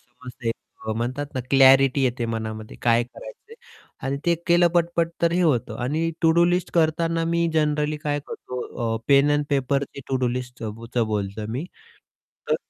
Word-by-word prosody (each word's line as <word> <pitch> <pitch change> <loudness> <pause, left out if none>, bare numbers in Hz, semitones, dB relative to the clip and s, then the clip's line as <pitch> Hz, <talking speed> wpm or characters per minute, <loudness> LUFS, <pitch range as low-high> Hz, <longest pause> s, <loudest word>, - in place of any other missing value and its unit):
समजते 125 -1 -9
एक 115 - 0 0.4
म्हणतात 130 +5 -2
ना, 130 - -1
क्लॅरिटी 135 0 +6
येते 120 -2 -1
मनामध्ये, 110 -1 -5
काय 120 0 +4
करायचं - - -13
आहे - - -12 0.5
आणि 135 +1 -1
ते 170 - +4
केलं 175 0 +5
पटपट 170 -1 +2
तर 170 - +3
हे 175 - +1
होतं 140 -9 +1
आणि 160 +6 0
टू-डू 165 +1 +5
लिस्ट 175 +1 0
करताना 165 0 +1
मी 170 0 +1
जनरली 150 -1 +1
काय 145 -1 -2
करतो 120 -2 -4
अ, - - -5
पेन 140 +1 +5
अँड 145 0 +2
पेपरची 140 0 -1
टू-डू 130 -2 +1
लिस्टचं 120 -3 -5
च - - +1
बोलतो 105 0 -3
मी. 135 +6 -3 0.9
तर - - +4
140 Hz, 165 wpm, -24 LUFS, 120-165 Hz, 0.9 s, क्लॅरिटी